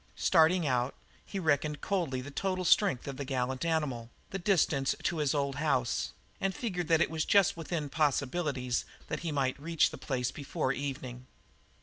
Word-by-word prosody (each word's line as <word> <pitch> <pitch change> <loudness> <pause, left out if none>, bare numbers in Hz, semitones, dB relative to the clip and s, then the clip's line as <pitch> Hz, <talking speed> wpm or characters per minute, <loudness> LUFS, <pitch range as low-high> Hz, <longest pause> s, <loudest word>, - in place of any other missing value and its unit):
Starting 170 0 +4
out, 125 - 0 0.3
he - - -6
reckoned 150 -3 +1
coldly 170 -10 -1
the 140 +3 -8
total 185 +3 -1
strength 180 - +3
of 135 -1 -5
the 140 - -3
gallant 130 0 -2
animal, 150 -8 -1 0.2
the 195 - -3
distance 160 -7 +2
to 175 - 0
his 150 -1 +1
old 140 -2 -1
house, 130 -6 0 0.3
and 195 -1 -1
figured 180 -8 -2
that 165 -1 +4
it - - +2
was 160 -1 0
just 200 +2 +4
within 165 -2 -3
possibilities 140 -3 0 0.3
that - - -2
he 165 - -3
might 135 -2 0
reach 165 +1 +2
the - - -8
place 125 -3 -1
before 140 -1 -2
evening. 130 -3 -5
150 Hz, 170 wpm, -31 LUFS, 130-170 Hz, 0.3 s, Starting